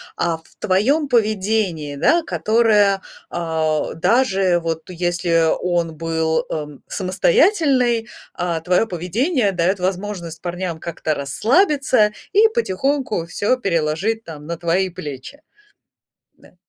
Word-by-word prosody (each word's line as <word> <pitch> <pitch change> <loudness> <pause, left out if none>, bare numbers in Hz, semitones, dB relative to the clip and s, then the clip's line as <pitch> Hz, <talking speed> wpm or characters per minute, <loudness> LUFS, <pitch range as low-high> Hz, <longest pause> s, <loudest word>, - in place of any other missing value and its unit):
а 165 -1 0
в 160 - -24
твоем 265 +12 +2
поведении, 210 - 0
да, 335 - +3
которое, 215 -7 +2 0.3
а, 160 -2 -1
даже 190 -2 +2
вот 165 0 -4
если 175 -1 +1 0.2
он 170 -2 -1
был, 160 0 -1
ам, 150 -2 -6
самостоятельный, 255 - +2 0.3
а 170 -2 -2
твое 180 +6 +2
поведение 210 - 0
дает 185 +2 0
возможность 180 -3 -4
парням 175 -1 -4
как-то 160 -2 -3
расслабиться 250 - +2 0.2
и 430 +3 +6
потихоньку 270 - -1
всё 205 +8 0
переложить 195 +2 -1
там 150 -5 -10
на 170 +2 -4
твои 175 +3 0
плечи. 150 - -8 1.0
Да. - - -21
185 Hz, 110 wpm, -20 LUFS, 165-225 Hz, 1.0 s, и